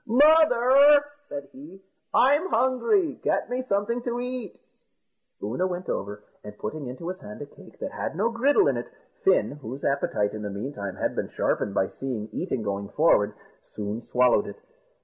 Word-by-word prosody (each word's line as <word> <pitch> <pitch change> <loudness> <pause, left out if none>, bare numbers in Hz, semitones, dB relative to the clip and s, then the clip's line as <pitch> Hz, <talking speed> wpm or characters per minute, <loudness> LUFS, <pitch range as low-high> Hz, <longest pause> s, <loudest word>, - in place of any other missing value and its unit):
"Mother," 285 +1 +6 0.2
said 140 -1 -6
he, 155 +8 -12 0.3
"I'm 290 +7 +4
hungry 260 - +1
get - - 0
me 250 +1 -1
something 235 0 -1
to 240 0 -3
eat." 250 -4 -5 0.8
Oonagh 125 - -1
went 180 0 -5
over, 105 +1 -4 0.2
and 105 0 -10
putting 140 +6 -5
into 130 +7 -7
his 185 0 -5
hand 105 - -10
a - - -7
cake - - -17
that - - -5
had - - -4
no 215 +6 +1
griddle 285 - +3
in - - +1
it, - - -5 0.4
Fin, 390 - +3
whose 130 +3 -7
appetite 120 -7 0
in 110 - -6
the 105 - -4
meantime 100 -2 -5
had - - -2
been - - -2
sharpened 100 -1 -1
by 95 - +2
seeing 115 -4 -5
eating 150 -10 -3
going 100 -1 -3
forward, 150 -10 +3 0.4
soon 105 +2 -4
swallowed 125 - +2
it. - - -9
175 Hz, 170 wpm, -26 LUFS, -, 0.8 s, Mother